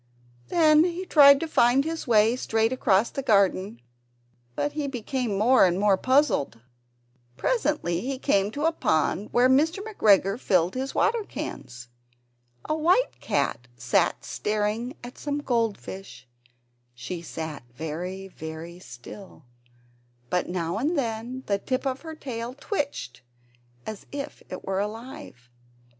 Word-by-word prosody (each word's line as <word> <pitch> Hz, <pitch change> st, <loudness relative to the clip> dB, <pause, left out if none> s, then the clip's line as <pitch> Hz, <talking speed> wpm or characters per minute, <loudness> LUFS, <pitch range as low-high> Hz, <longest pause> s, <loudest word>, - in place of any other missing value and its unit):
Then 310 Hz, -2 st, +5 dB
he 355 Hz, +1 st, -2 dB
tried 280 Hz, -5 st, +7 dB
to 330 Hz, -, -2 dB
find 265 Hz, -2 st, +3 dB
his 325 Hz, -2 st, -4 dB
way 225 Hz, 0 st, +4 dB
straight 225 Hz, -1 st, 0 dB
across 220 Hz, -4 st, +2 dB
the 275 Hz, -, -3 dB
garden, 200 Hz, -, +1 dB, 0.7 s
but 290 Hz, -, -1 dB
he 295 Hz, -1 st, -3 dB
became 245 Hz, -4 st, -2 dB
more 245 Hz, +6 st, +5 dB
and 180 Hz, 0 st, +3 dB
more 205 Hz, -1 st, +4 dB
puzzled. 260 Hz, -, +2 dB, 0.8 s
Presently, 295 Hz, -, 0 dB
he 265 Hz, +2 st, -3 dB
came 200 Hz, -7 st, +1 dB
to 290 Hz, +8 st, -3 dB
a 325 Hz, -, +4 dB
pond 200 Hz, -, 0 dB
where 245 Hz, +1 st, +4 dB
Mr. 300 Hz, +7 st, +3 dB
McGregor 210 Hz, -, +3 dB
filled 180 Hz, -6 st, +2 dB
his 265 Hz, +1 st, -4 dB
water 460 Hz, -1 st, +2 dB
cans. 120 Hz, -, -7 dB, 0.8 s
A -, -, -1 dB
white 350 Hz, +10 st, +2 dB
cat 125 Hz, -, -1 dB
was 120 Hz, 0 st, +3 dB, 0.2 s
staring 215 Hz, +5 st, -2 dB
at 245 Hz, +1 st, -10 dB
some 290 Hz, -1 st, -2 dB
goldfish; 220 Hz, -, -3 dB, 0.7 s
she 165 Hz, +9 st, -6 dB
sat 160 Hz, -3 st, -6 dB
very, 170 Hz, +8 st, -5 dB
very 165 Hz, 0 st, -8 dB
still, 135 Hz, -, -12 dB, 0.9 s
but 180 Hz, -, 0 dB
now 175 Hz, +2 st, -2 dB
and 305 Hz, +7 st, 0 dB
then 240 Hz, +1 st, -3 dB
the 200 Hz, -1 st, 0 dB
tip 255 Hz, +6 st, -2 dB
of 265 Hz, -1 st, -2 dB
her 320 Hz, -1 st, -8 dB
tail 245 Hz, -4 st, -6 dB
twitched 285 Hz, -, -4 dB, 0.6 s
as 215 Hz, -2 st, -7 dB
if 285 Hz, +1 st, -6 dB
it 185 Hz, -, -7 dB
were 190 Hz, 0 st, -1 dB
alive. 220 Hz, -, -7 dB
225 Hz, 135 wpm, -26 LUFS, 185-280 Hz, 0.9 s, tried